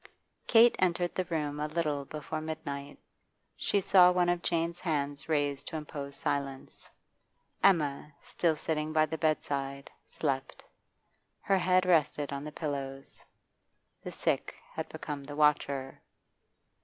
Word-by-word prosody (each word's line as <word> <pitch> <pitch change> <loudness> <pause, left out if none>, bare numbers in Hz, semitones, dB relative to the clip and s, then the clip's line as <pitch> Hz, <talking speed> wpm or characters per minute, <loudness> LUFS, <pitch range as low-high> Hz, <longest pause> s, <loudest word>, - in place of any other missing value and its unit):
Kate 230 0 +7
entered 175 -1 +1
the 185 - -1
room 150 -4 -2
a 150 - -1
little 150 -3 -1
before 155 +2 -5
midnight. 145 -3 -5 0.6
She 200 - +1
saw 180 -1 +7
one 180 -1 +2
of 175 0 +1
Jane's 170 0 -1
hands 145 -4 -2
raised 145 -3 0
to - - -6
impose 145 -2 -6
silence. 140 -1 -4 0.7
Emma, 150 -5 +3
still 165 -2 0
sitting 155 0 -2
by 155 0 +4
the 160 +1 -5
bedside, 140 -3 -1 0.2
slept; 135 -3 -3 0.8
her 195 -1 +2
head 185 0 +3
rested 150 -4 +2
on 140 0 -4
the 150 - -6
pillows. 140 -3 -5 0.8
The - - -6
sick - - -1 0.2
had - - -4
become 145 -2 -6
the 145 +1 -8
watcher. 140 -3 +1
150 Hz, 130 wpm, -30 LUFS, 140-170 Hz, 0.8 s, Kate